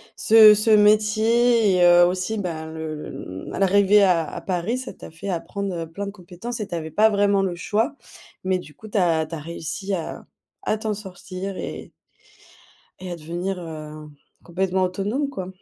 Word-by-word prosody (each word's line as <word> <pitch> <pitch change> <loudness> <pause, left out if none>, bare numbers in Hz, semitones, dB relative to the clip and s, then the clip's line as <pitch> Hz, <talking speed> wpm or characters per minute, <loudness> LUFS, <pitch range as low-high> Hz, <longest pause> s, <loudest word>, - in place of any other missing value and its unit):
ce 215 -1 +8
ce 210 +2 0
métier 215 +1 +4
et 175 - +4
heu, 175 0 +7
aussi, 185 +5 -1
bah, 165 -5 -4
le 160 -1 -6
le 95 +1 -8
l'arrivée 200 +1 +5
à 175 -4 +3
à - - -6
Paris, 190 +6 -2
ça 255 - -7
t'a - - -12
fait 165 +5 -9
apprendre, 195 +2 -3
heu, 165 -1 -4
plein 200 +4 -5
de - - -5
compétences 200 +5 -8
et 205 - -4
tu - - -5
avais 160 -1 -5
pas 215 +7 +4
vraiment 200 -1 +2
le 180 -2 -2
choix. 220 - -1 0.5
Mais 185 -1 +2
du 150 -4 -12
coup, 220 - -12
tu 210 - -3
as 165 -4 +2
tu 160 +2 -7
as 155 - -6
réussi 170 +5 -5
à 170 -3 -5 0.4
à 215 - 0
t'en 215 0 -2
sortir 190 -1 -7
et - - -7 1.1
et 185 -1 -7
à 175 - -4
devenir, 175 +4 -4
heu, 155 -2 -8 0.4
complètement 185 +1 0
autonome, 205 +10 -2
quoi. 190 -10 -6
190 Hz, 185 wpm, -23 LUFS, 170-210 Hz, 1.1 s, ce